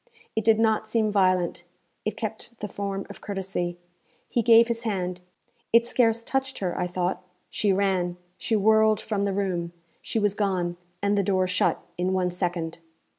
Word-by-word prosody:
It 220 - 0
did 220 0 +5
not 220 -1 +2
seem 220 -1 +2
violent; 185 -3 +2 0.4
it - - -2
kept 235 - -6
the 210 - -3
form 195 -1 -4
of - - -11
courtesy. 190 -3 -3 0.5
He 240 - +1
gave 230 0 +7
his 235 -1 -2
hand; 185 -5 -2 0.5
it 235 +1 +6
scarce 230 -2 +2
touched 265 +1 -2
her, 180 -3 -2
I 180 - -1
thought; 180 +1 -1 0.3
she 205 - +1
ran, 185 -2 +1 0.2
she 225 - -1
whirled 220 +1 +4
from 205 -3 -1
the 200 - 0
room; 180 -3 -2 0.3
she - - -3
was 205 -2 +2
gone, 185 -4 0 0.3
and 200 0 +3
the - - +2
door 185 -1 +2
shut, 180 0 +1 0.2
in 185 +1 +1
one 180 -1 +1
second. 175 -2 -2
200 Hz, 175 wpm, -26 LUFS, 180-220 Hz, 0.5 s, gave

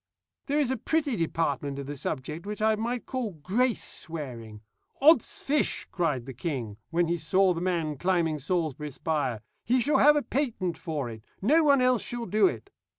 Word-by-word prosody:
"There 290 +1 +1
is 285 -4 +2
a 260 - 0
pretty 305 -5 0
department 145 -5 -1
of 140 - -5
the 145 +2 -5
subject 150 +6 -4
which 210 0 -4
I 220 +1 +3
might 235 +3 -2
call 250 -7 -3
grace 200 - 0
swearing. 120 -10 -6 0.4
'Od's 315 +4 +4
fish,' 295 +1 +1
cried 150 -9 -1
the 135 - -7
king, 125 - -4
when 170 0 +1
he 170 +1 0
saw 185 +5 +3
the 170 - -4
man 165 -6 -1
climbing 170 -4 +1
Salisbury 150 -1 -2
spire; 145 -6 -2 0.2
'he 250 +3 +2
shall 285 +5 +2
have 295 +1 +7
a 295 - +1
patent 225 - -1
for 155 -5 -4
it 110 -2 -9 0.2
no 305 +11 +4
one 280 -3 +5
else 250 -2 +3
shall 240 -1 -4
do 210 -2 +4
it.' 110 -10 -5
175 Hz, 185 wpm, -28 LUFS, 145-240 Hz, 0.4 s, have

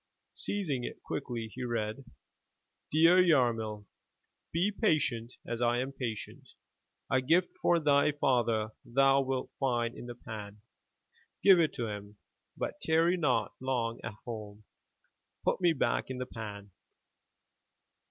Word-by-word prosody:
Seizing 155 -12 -2
it - - -7
quickly 115 -3 -4
he 130 - -5
read: 115 +1 -2 0.9
"Dear 165 +4 +6
Yarmil, 115 - +2 0.3
— - - -49
Be 180 +5 +1
patient 145 - 0
as 120 0 -4
I 120 0 +3
am 130 +2 -2
patient. 115 -6 -5 0.6
A 130 - +3
gift 170 +7 +3
for 175 -1 +4
thy 145 -1 +4
father 120 -6 +1
thou 135 +2 +4
wilt 130 -1 -2
find 120 -3 0
in 120 - -8
the 120 - -7
pan. 105 -4 -8 0.8
Give 190 -3 +8
it 160 -2 +2
to 120 - -2
him, 105 -1 -7 0.4
but - - -4
tarry 165 +2 +3
not 150 -8 +1
long 120 -3 -1
at 115 -3 -5
home. 105 -3 -7 0.8
Put - - +1
me 175 -2 +5
back 150 - 0
in 130 - -4
the 125 - -3
pan." 105 -4 -8
125 Hz, 135 wpm, -31 LUFS, 115-150 Hz, 0.9 s, Give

